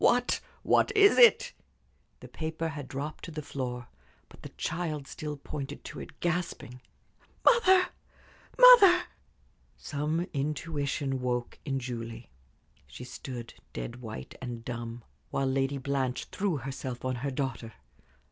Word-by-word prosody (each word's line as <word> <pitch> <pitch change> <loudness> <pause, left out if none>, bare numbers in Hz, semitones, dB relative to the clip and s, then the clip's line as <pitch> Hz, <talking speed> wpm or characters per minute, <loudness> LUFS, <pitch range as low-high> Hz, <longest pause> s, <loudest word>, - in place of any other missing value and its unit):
"What 245 0 +3 0.2
what - - +3
is 405 +3 +7
it?" 485 0 +7 0.7
The - - -9
paper 160 0 -3
had 145 -3 -6
dropped 145 +4 -5
to - - -7
the 155 -1 -5
floor, 125 -5 -4 0.4
but - - -16
the - - -8
child 155 -3 -2
still 150 +1 -6
pointed 140 0 -6
to - - -8
it, 155 - -10
gasping. 170 -8 -2 0.6
"Mother 380 -6 +6 0.7
mother!" 475 -8 +9 0.7
Some 150 +3 -2
intuition 140 -2 -2
woke 125 -1 -2
in 135 -2 -1
Julie. 115 -2 -6 0.6
She 65 - -10
stood 125 -1 -7 0.2
dead 115 - -5
white 110 - -8
and 120 -2 -6
dumb, 120 -1 -5 0.3
while 135 - 0
Lady 135 +1 0
Blanche 135 -1 -1
threw 190 -6 -1
herself 130 -1 -5
on 130 -1 -1
her 140 +3 -2
daughter. 130 -4 -3
140 Hz, 130 wpm, -29 LUFS, 125-160 Hz, 0.7 s, mother